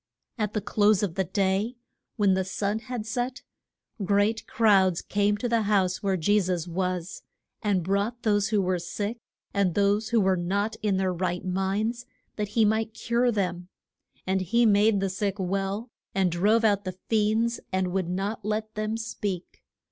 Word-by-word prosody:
At 210 -1 -1
the 210 - -1
close 205 0 +3
of 190 -5 -1
the 190 +1 0
day, 200 +5 0 0.4
when 200 -3 +3
the 190 0 +1
sun 200 +3 -2
had 235 -1 -5
set, 245 +2 -3 0.6
great 205 +3 +1
crowds 195 -6 +4
came 205 0 +1
to 245 - -2
the 230 -1 +2
house 195 -3 +1
where 195 -2 +1
Je 205 +6 +3
sus 180 -3 -1
was, 180 0 -3 0.4
and 200 -5 +1
brought 200 +6 -1
those 205 -2 +2
who 210 -3 +1
were 180 -1 0
sick, 205 +7 -4 0.3
and 195 -4 +1
those 205 +2 +2
who 235 -1 +3
were 190 -2 +3
not 200 +5 -1
in 205 -3 +1
their 190 -1 +1
right 180 0 -2
minds, 200 +6 -1 0.3
that 210 -1 -2
he 220 +2 +2
might 220 +1 0
cure 240 +2 +1
them. 180 -4 -2 0.6
And 190 0 +1
he 235 +7 +2
made 205 -1 +4
the 195 - 0
sick 200 +1 -2
well, 195 +4 -2 0.2
and 190 -2 +2
drove 210 +7 +3
out 205 -2 +3
the 185 -1 -5
fiends, 225 +2 +1
and 185 -1 0
would 185 -1 -1
not 200 +4 -3
let 215 +1 -2
them 215 +1 -2
speak. 205 -5 -5
205 Hz, 175 wpm, -27 LUFS, 190-220 Hz, 0.6 s, crowds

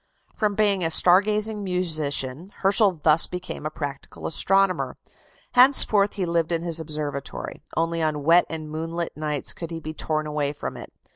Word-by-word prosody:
From 210 -2 -1
being 200 -3 +1
a 165 - +1
star 180 +3 +5
gazing 210 0 0
musician, 155 -4 -2
Herschel 195 -3 +3
thus 155 +1 +5
became 180 -4 -6
a - - -4
practical 145 -2 -7
astronomer. 195 +3 +1 0.5
Henceforth 245 -6 +6
he 195 -3 -2
lived 170 -1 -1
in 165 0 -1
his 165 -1 -1
observatory; 150 -3 -5 0.2
only 165 0 0
on 155 -2 -1
wet 170 +4 +5
and 155 -1 -6
moonlight 165 +2 -5
nights 150 -2 -3
could 165 - -7
he 165 -1 -6
be 155 0 -7
torn 155 -1 -2
away 150 -1 -2
from 145 - -6
it. - - -10
165 Hz, 165 wpm, -24 LUFS, 155-190 Hz, 0.5 s, Henceforth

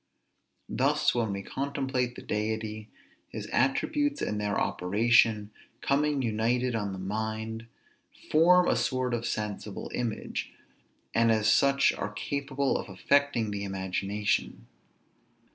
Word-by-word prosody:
Thus, - - +2
when 115 -4 0
we 100 0 -4
contemplate 130 -1 -2
the - - -9
Deity, 110 0 -3 0.4
his - - -6
attributes 285 - +1
and 105 0 -2
their 105 -1 0
operation, 105 +2 +2 0.3
coming 145 0 +1
united 120 +3 0
on 105 -3 -2
the 95 - -6
mind, 110 +3 -4 0.6
form 175 +3 +6
a - - +3
sort 130 -1 0
of 120 0 -1
sensible 105 -2 -4
image, 120 -3 -3 0.6
and 115 0 +4
as 110 -1 +4
such 140 0 +4
are 105 - -4
capable 140 +5 -1
of - - -7
affecting 120 +3 +1
the 100 -1 -3
imagination. 100 +2 -2
115 Hz, 120 wpm, -28 LUFS, 105-135 Hz, 0.6 s, form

